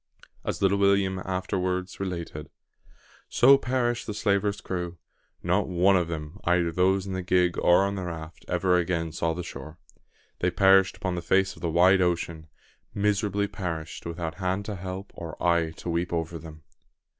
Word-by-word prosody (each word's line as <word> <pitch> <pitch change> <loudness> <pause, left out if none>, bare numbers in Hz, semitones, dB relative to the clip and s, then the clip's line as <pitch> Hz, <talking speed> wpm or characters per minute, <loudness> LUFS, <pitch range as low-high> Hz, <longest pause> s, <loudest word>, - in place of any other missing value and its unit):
As - - -3
little 100 +1 +3
William 100 -1 +2
afterwards 95 0 -2
related 85 -5 -5 0.8
"So 135 +3 +7
perished 120 -2 -1
the 105 - -4
slaver's 100 -1 +1
crew. 90 -1 -4 0.5
Not - - +1
one 95 +2 +3
of 90 -3 +2
them, 80 +2 -6
either 85 -1 +2
those 95 +3 +2
in 95 - -5
the 95 - -2
gig 90 -1 +2
or 90 +2 +5
on 100 - -1
the 95 -2 -4
raft, 80 -1 -7
ever 90 0 +2
again 85 -2 -1
saw 80 +1 -1
the 90 - -4
shore. 80 -1 -9 0.6
They 90 - +2
perished 95 +1 +4
upon 95 - -2
the 85 - -3
face 95 +3 +2
of - - -15
the 85 - -1
wide 90 +3 +5
ocean 85 -2 -1 0.5
miserably 100 0 +1
perished, 85 -5 -5
without 85 -1 -4
hand 95 +2 -1
to 105 - -4
help 95 +1 -6
or 85 -2 -8
eye 85 -2 +2
to - - -7
weep 85 +1 -1
over 85 0 -2
them!" 80 -2 -12
90 Hz, 170 wpm, -26 LUFS, 85-95 Hz, 0.8 s, So